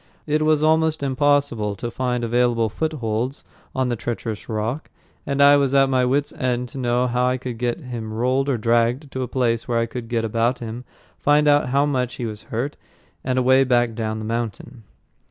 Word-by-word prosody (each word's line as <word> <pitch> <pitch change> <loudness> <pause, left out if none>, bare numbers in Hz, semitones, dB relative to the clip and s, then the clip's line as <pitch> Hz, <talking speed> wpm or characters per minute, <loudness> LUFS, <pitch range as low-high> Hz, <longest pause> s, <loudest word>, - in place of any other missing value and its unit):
It 155 0 +1
was 155 -1 +3
almost 160 -1 +2
impossible 140 -6 +1
to 120 +4 -5
find 125 -1 -2
available 120 -1 +2
footholds 125 -2 -2 0.3
on 130 -1 0
the 120 - 0
treacherous 115 -1 -5
rock, 110 +7 -3 0.4
and 140 0 +2
I 145 0 +7
was 140 -1 +1
at 135 -1 +4
my 130 -1 +3
wits' 140 +3 0
end 125 -1 -2
to 135 - -8
know 125 0 +1
how 125 +1 +1
to 125 -1 -5
get 120 +6 -2
him 120 -5 -6
rolled 130 +5 0
or 130 - +1
dragged 120 +5 +1
to 130 - -4
a 125 - -2
place 120 -3 0
where 120 -2 0
I 115 - +2
could 115 0 -7
get 115 -2 0
about 115 +3 +1
him, 120 +2 -7 0.3
find 150 +1 +3
out 145 -3 +4
how 140 +2 +3
much 130 -3 -1
he 120 - -4
was 105 -2 -6
hurt, 125 +6 -3 0.5
and 130 0 -1
a 130 - +3
way 130 +1 +5
back 120 -2 +2
down 110 -1 -3
the 110 - -5
mountain. 115 +1 -4
125 Hz, 200 wpm, -22 LUFS, 115-135 Hz, 0.5 s, I